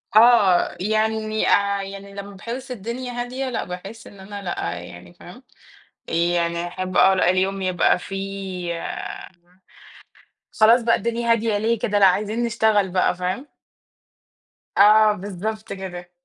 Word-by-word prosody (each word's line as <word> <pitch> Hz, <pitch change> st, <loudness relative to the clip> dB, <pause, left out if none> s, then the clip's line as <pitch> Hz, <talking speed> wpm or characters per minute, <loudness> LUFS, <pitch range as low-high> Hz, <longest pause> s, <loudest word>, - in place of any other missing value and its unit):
آه، 215 Hz, -8 st, +5 dB
يعني، 215 Hz, +1 st, 0 dB
آآ، 200 Hz, 0 st, +2 dB
يعني 195 Hz, 0 st, -9 dB
لمّا 200 Hz, 0 st, -8 dB
باحس 245 Hz, +6 st, -7 dB
الدنيا 245 Hz, +3 st, -5 dB
هادية، 250 Hz, +2 st, -4 dB
لأ، 245 Hz, -, -2 dB
باحس 195 Hz, +5 st, -9 dB
إن 200 Hz, -, -14 dB
أنا 200 Hz, +1 st, -8 dB
لأ، 175 Hz, -, -3 dB
يعني، 85 Hz, 0 st, -12 dB
فاهم، -, -, -14 dB, 0.7 s
آآ، -, -, -6 dB
يعني 170 Hz, 0 st, 0 dB
أحب 185 Hz, +1 st, -5 dB
آه 190 Hz, -, +6 dB
لأ 185 Hz, -1 st, +3 dB
اليوم 190 Hz, +1 st, 0 dB
يبقى 185 Hz, -1 st, +2 dB
فيه 190 Hz, -3 st, -5 dB, 1.8 s
خلاص 230 Hz, +3 st, +6 dB
بقى 230 Hz, 0 st, +3 dB
الدنيا 235 Hz, 0 st, -1 dB
هادية 225 Hz, -2 st, +1 dB
ليه 225 Hz, +2 st, 0 dB
كده، 205 Hz, -1 st, 0 dB
لأ 195 Hz, -, +7 dB
عايزين 210 Hz, +5 st, +1 dB
نشتغل 220 Hz, -4 st, +2 dB
بقى، 185 Hz, -1 st, +1 dB
فاهم. 185 Hz, +10 st, -3 dB, 1.3 s
آه، 215 Hz, +1 st, +6 dB
بالضبط 205 Hz, +2 st, -5 dB
كده. 180 Hz, -2 st, -8 dB
200 Hz, 135 wpm, -22 LUFS, 185-220 Hz, 1.8 s, لأ